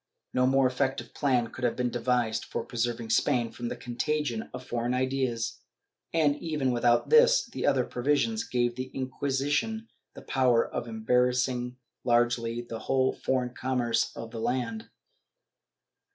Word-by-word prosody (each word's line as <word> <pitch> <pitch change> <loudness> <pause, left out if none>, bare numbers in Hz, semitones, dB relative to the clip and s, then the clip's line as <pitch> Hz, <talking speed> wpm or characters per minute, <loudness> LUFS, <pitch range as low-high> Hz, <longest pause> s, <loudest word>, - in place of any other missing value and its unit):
^ - - -59 0.3
No 125 0 +3
more 135 0 +4
effective 130 +1 -1
plan 125 -5 +1
could 130 - -9
have 120 - +1
been 125 -1 -1
devised 120 -2 0
for - - -4
preserving 120 -1 -2
Spain 115 +1 +2
from 120 +1 -5
the - - -3
contagion 120 -1 -2
of 125 0 -8
foreign 120 +1 -1
ideas 130 -3 -1 0.5
and, 155 -3 +3
even 150 -5 -1
without 120 - +2
this, - - +6
the - - -3
other 135 -3 +3
provisions 145 - 0
gave 120 - 0
to - - -19
the 130 0 -4
Inquisition 140 - -1 0.3
the - - -10
power 125 -3 +3
of 120 - -4
embarrassing 125 +2 +1 0.3
largely 120 -1 +1
the 115 -1 -7
whole 130 +2 +1
foreign 125 -2 -1
commerce 125 -3 0
of 115 0 -7
the 115 - -6
land. 115 -2 -2
125 Hz, 150 wpm, -28 LUFS, 120-135 Hz, 0.5 s, this